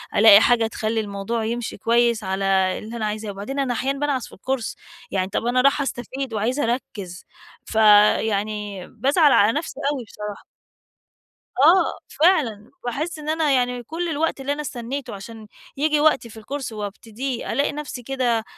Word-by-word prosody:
ألاقي 210 -1 +8
حاجة 230 -2 +3
تخلّي 220 0 -2
الموضوع 210 +2 -3
يمشي 235 +1 -3
كويس 235 +1 +2
على 190 +1 -2 0.3
اللي 225 +2 -8
أنا 220 - -2
عايزاه. 210 0 -3
وبعدين 210 +8 -5
أنا 255 -3 0
أحيانًا 270 +4 -2
بانعس 285 -4 -1
في - - -17
الكورس، 255 +2 -3 0.4
يعني 190 -1 -1
طَب 230 - -2
أنا 250 +1 +2
راحة 275 +2 +3
أستفيد 260 0 -5
وعايزة 235 +7 0
أركز، 205 -7 -4 0.4
ف - - -8 0.4
يعني 210 -2 -3
بازعل 290 +2 +3
على 205 +3 +5
نفسي 305 -3 -5
أوي 270 -4 -4
بصراحة. 210 -1 -8 1.1
آه، 330 +8 +4
فعلًا. 275 - +1
باحس 305 +7 -3
إن 305 0 -6
أنا 315 -2 +1
يعني 250 -1 +1
كل 330 +7 -4
الوقت 315 -2 -1
اللي 280 +2 -1
أنا 295 - -4
استنيته 255 -3 -5
عشان 220 +2 -10 0.3
ييجي 300 +1 +2
وقتي 295 -6 +3
في 220 - -13
الكورس 270 +4 -5
وأبتديه، 220 +4 -5
ألاقي 280 +4 +1
نفسي 290 -4 -6
كده 245 -3 0
240 Hz, 160 wpm, -22 LUFS, 215-280 Hz, 1.1 s, ألاقي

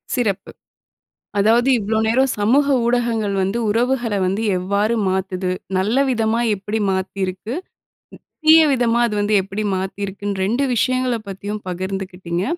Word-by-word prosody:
சிறப்பு. 215 -7 -1 0.9
அதாவது 230 +5 +3
இவ்வளோ 220 +1 -1
நேரம், 260 +4 +2
சமூக 250 +8 +3 0.2
ஊடகங்கள் 235 -4 0
வந்து 195 +5 -1
உறவுகள 240 +1 0
வந்து 195 +4 -1 0.2
எவ்வாறு 200 +5 0
மாத்துது? 185 -1 -2 0.3
நல்ல 205 +6 0
விதமா 225 -1 +1 0.2
எப்படி 205 +3 -3
மாத்திருக்கு? 190 +3 -3 0.9
தீய 320 +1 +8
விதமா 235 -3 +2
அது 220 - -3
வந்து 205 +1 +1
எப்படி 195 +3 -5
மாத்திருக்குன்னு, 200 +1 -4
2 240 +7 +1
விஷயங்களப் 250 -2 0
பத்தியும் 205 +2 -5
பகிர்ந்துக்கிட்டீங்க. 185 -1 -4
210 Hz, 120 wpm, -20 LUFS, 190-235 Hz, 0.9 s, தீய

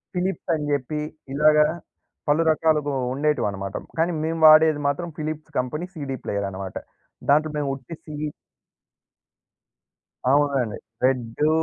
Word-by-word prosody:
Philips 185 0 -2
అని 150 -2 -1
జెప్పి, 145 +2 -1 0.3
ఇలాగ 150 +1 +5 0.7
పలు 155 +3 +4
రకాలుగా 150 -3 +1 0.2
ఉండేటివన్నమాట. 105 -10 -1 0.2
కానీ 170 +2 +3
మేము 165 +1 -1
వాడేది 155 -1 +7
మాత్రం 170 +5 -1
ఫిలిప్స్ 155 0 -5
కంపెనీ 150 +7 -2
సీడీ 135 -4 -4
ప్లేయర్ 100 -1 -1
అన్నమాట. 95 -1 -7 0.5
దాంట్లో 155 +2 +4
మేము 145 -2 -1
ఉట్టి 135 +5 -9
సియి 150 -1 -4 2.0
అవునండి. 140 -6 +2 0.3
రెడ్డు, 130 +3 +1
150 Hz, 115 wpm, -24 LUFS, 130-155 Hz, 2.0 s, వాడేది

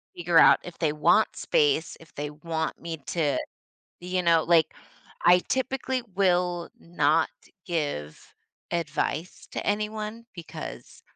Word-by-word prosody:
to - - -12
figure 175 -1 +2
out - - +7
if 175 - -10
they 160 -3 +2
want 150 -1 +3
space, 150 +2 +1
if 160 -2 -18
they 145 0 -4
want 160 +1 -4
me 165 -1 -5
to 150 -6 0 0.6
you 180 +1 -2
know 165 -2 +4
like, 165 -2 +3 0.5
I 180 +1 +7
typically 260 0 -1
will 180 -2 +1
not 160 -1 +1 0.4
give 145 - -4 0.4
advice 165 0 -3
to - - -4
anyone 215 +2 -2
because 170 -3 -9
170 Hz, 130 wpm, -26 LUFS, 155-180 Hz, 0.6 s, out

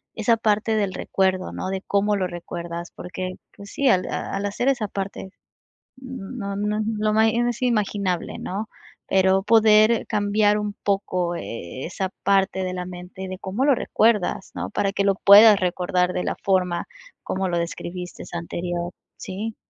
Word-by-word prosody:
esa 225 +1 +3
parte 220 0 +1
del 200 -3 0
recuerdo, 190 -1 0
¿no? - - -4
De 190 0 -3
cómo 205 +1 +1
lo 190 -2 0
recuerdas 170 0 -6
porque, 185 +1 -5 0.2
pues, 200 0 -11
sí, 280 - 0
al 185 -6 +3
al 195 +1 -3
hacer 205 +6 -2
esa 245 -6 0
parte 195 -1 -5 0.7
no 250 -5 -6
no 210 +1 -1 0.2
lo 215 +1 +1
es 235 +2 +1
imaginable, 205 -6 -1
¿no?, 205 +4 -4 0.4
pero 190 0 +3
poder 220 0 +5
cambiar 210 0 +2
un 210 -1 -3
poco, 185 -3 0
eh 115 - -6
eh, - - -3
esa 185 +2 -3
parte 195 -1 +2
de 185 0 -3
la 180 -1 -4
mente 180 +1 -8
de 185 0 -6
cómo 195 +7 -3
lo 285 -2 +5
recuerdas, 215 -5 +1
¿no?, - - -4
para 205 -1 0
que 200 - 0
lo 195 -1 +3
puedas 205 +2 +8
recordar 180 0 0
de 180 - -1
la - - -2
forma 180 -3 +1 0.4
como 190 0 -2
lo 175 - 0
describiste 175 +1 -5
anterior, 175 0 -3 0.3
¿sí? 210 +4 -5
195 Hz, 160 wpm, -23 LUFS, 180-215 Hz, 0.7 s, puedas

